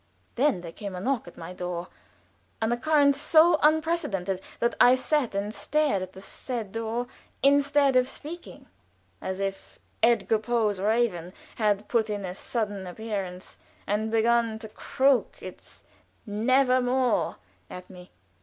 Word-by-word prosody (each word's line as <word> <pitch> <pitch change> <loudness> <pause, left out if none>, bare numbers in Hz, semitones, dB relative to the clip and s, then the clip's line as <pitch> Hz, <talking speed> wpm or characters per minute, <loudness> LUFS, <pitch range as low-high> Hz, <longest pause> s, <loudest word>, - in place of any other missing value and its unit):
Then 255 -7 +1
there 170 -1 -8
came 200 +2 -7
a - - -5
knock 250 +2 -1
at 175 - -13
my 170 +2 -8
door, 180 -1 -4 0.7
an 225 +1 0
occurrence 280 +2 +3
so 320 +1 +5
unprecedented 300 - +1 0.2
that 235 - +1
I 250 +1 +8
sat 260 -3 0
and 205 +2 -2
stared 275 +1 0
at 185 0 -7
the 190 - -11
said 225 0 -6
door 225 +2 -3 0.4
instead 280 0 +4
of 255 0 +4
speaking, 330 +6 -9 0.6
as 190 0 -4
if 195 0 -5 0.2
Edgar 230 -1 +3
Poe's 215 -3 0
raven 200 -5 0 0.2
had 210 -2 +1
put 225 -3 +1
in 205 -2 -3
a 180 - -5
sudden 205 -2 -3
appearance 190 -2 -6 0.3
and 215 +2 -1
begun 230 0 +2
to 220 -1 -9
croak 265 +4 +1
its - - -12 0.4
"never 255 +4 +2
more" 250 0 +1 0.3
at 180 0 -9
me. 180 -1 -13
225 Hz, 145 wpm, -27 LUFS, 195-260 Hz, 0.7 s, I